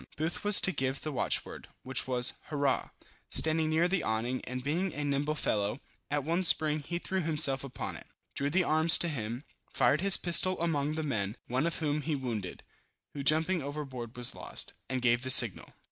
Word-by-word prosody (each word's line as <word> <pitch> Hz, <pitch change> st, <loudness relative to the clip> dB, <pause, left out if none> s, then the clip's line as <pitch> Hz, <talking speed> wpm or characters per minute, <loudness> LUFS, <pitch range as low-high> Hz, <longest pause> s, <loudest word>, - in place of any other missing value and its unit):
Booth 160 Hz, +5 st, -4 dB
was 205 Hz, -1 st, +6 dB
to 190 Hz, -, 0 dB
give 135 Hz, -3 st, -3 dB
the 155 Hz, -, -5 dB
watchword, 125 Hz, -4 st, -1 dB, 0.2 s
which 130 Hz, 0 st, 0 dB
was 125 Hz, -1 st, -1 dB
hurrah. 145 Hz, -3 st, -2 dB, 0.4 s
Standing 160 Hz, 0 st, +2 dB
near 160 Hz, +2 st, +1 dB
the 185 Hz, 0 st, -1 dB
awning, 115 Hz, +4 st, -3 dB
and 125 Hz, 0 st, -6 dB
being 170 Hz, +7 st, -2 dB
a 150 Hz, -, -4 dB
nimble 145 Hz, +1 st, -2 dB
fellow, 105 Hz, -3 st, -2 dB, 0.3 s
at 145 Hz, -1 st, -2 dB
one 170 Hz, +5 st, -1 dB
spring 155 Hz, -3 st, +3 dB
he 170 Hz, +4 st, -5 dB
threw 190 Hz, +2 st, -3 dB
himself 150 Hz, -4 st, 0 dB
upon 135 Hz, -, -7 dB
it, -, -, -13 dB, 0.3 s
drew 140 Hz, +1 st, -2 dB
the 180 Hz, +5 st, +1 dB
arms 160 Hz, +1 st, +6 dB
to 175 Hz, -, 0 dB
him, 120 Hz, -4 st, -5 dB, 0.3 s
fired 150 Hz, -, +2 dB
his 195 Hz, 0 st, +9 dB
pistol 180 Hz, +1 st, +4 dB
among 155 Hz, -3 st, -2 dB
the 160 Hz, 0 st, -4 dB
men, 105 Hz, -6 st, -4 dB
one 130 Hz, +6 st, -2 dB
of 170 Hz, -, -2 dB
whom 150 Hz, -1 st, -2 dB
he 150 Hz, +1 st, -3 dB
wounded, 115 Hz, -9 st, -6 dB, 0.5 s
(who 140 Hz, -, -6 dB
jumping 160 Hz, +5 st, +1 dB
overboard 135 Hz, -5 st, -7 dB
was 120 Hz, -1 st, -1 dB
lost) -, -, -5 dB, 0.2 s
and 130 Hz, -1 st, -4 dB
gave 120 Hz, 0 st, +2 dB
the 130 Hz, -, -4 dB
signal. -, -, +6 dB
145 Hz, 190 wpm, -29 LUFS, 130-160 Hz, 0.5 s, his